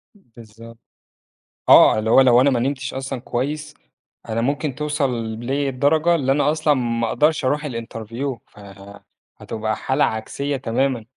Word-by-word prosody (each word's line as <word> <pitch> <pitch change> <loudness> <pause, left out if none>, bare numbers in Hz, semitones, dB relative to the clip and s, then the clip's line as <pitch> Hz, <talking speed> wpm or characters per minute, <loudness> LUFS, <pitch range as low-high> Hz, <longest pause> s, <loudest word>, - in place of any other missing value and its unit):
بالضبط. 115 - -15 0.9
آه، - - +7
اللي 110 +1 -1
هو 125 - +7
لو 125 -2 +5
أنا 140 +2 +4
ما 125 -3 0
نمتش 130 0 -3
أصلًا 135 -1 -5
كويس، 150 +5 -4 0.5
أنا 115 +1 -1
ممكن 140 +3 -1
توصل 150 -1 -1 0.3
لي 135 +4 -2
الدرجة 155 +6 +2
اللي 135 -5 +1
أنا 145 +1 +2
أصلًا 155 -1 +1
ما 115 -3 -1
أقدرش 150 +4 +1
أروح 150 +4 0
الinterview، 115 +1 -5
فهتبقى 100 +2 -8
حالة 130 - 0
عكسية 140 +6 -3
تمامًا. 125 -1 -1
130 Hz, 140 wpm, -21 LUFS, 115-145 Hz, 0.9 s, آه